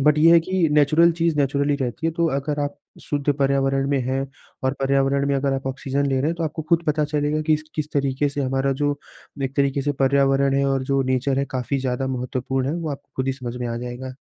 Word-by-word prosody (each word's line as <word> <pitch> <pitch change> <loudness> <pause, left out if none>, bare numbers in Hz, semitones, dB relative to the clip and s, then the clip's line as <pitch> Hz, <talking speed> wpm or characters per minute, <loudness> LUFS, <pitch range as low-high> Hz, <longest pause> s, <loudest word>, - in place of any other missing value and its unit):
But 150 +2 +4
ये 165 +2 +7
है 170 - +7
कि 180 0 +1
नैचुरल 155 +3 +5
चीज़ 165 -1 0
नैचुरली 140 +1 +1
ही - - +1
रहती 125 +6 -3
है। - - +2
तो 170 - +2
अगर 145 +1 -2
आप 145 0 -2 0.3
शुद्ध 145 0 0
पर्यावरण 135 0 +1
में 140 - +2
हैं 135 +1 0 0.4
और 130 - +2
पर्यावरण 135 0 +2
में 140 - +2
अगर 135 0 0
आप 135 0 -4
ऑक्सीज़न 135 +1 -1
ले 135 - 0
रहें - - -1
हैं 165 - 0
तो 165 - 0
आपको 160 +1 -4
खुद 170 0 +3
पता 150 0 +2
चलेगा 150 0 0
कि 155 - +4
इसक 155 0 -6
किस 150 -1 -3
तरीके 140 0 +1
से 145 +1 -4
हमारा 135 +1 0
जो 145 0 +1 0.4
एक 135 +1 -3
तरीके 140 0 +1
से 145 +1 0
पर्यावरण 135 0 +3
है 140 - +2
और 135 -1 +1
जो 135 0 +3
नेचर 130 +1 0
है 140 - +1
काफ़ी 130 +2 -1
ज़्यादा 130 0 -2
महत्वपूर्ण 130 0 -2
है। 150 - -1
वो 165 -2 -3
आपको 140 0 -8
खुद 130 - -1
ही 135 - +1
समझ 125 -2 -6
में 125 - -3
आ 115 - -3
जाएगा। 125 +2 -6
140 Hz, 250 wpm, -22 LUFS, 135-150 Hz, 0.4 s, ये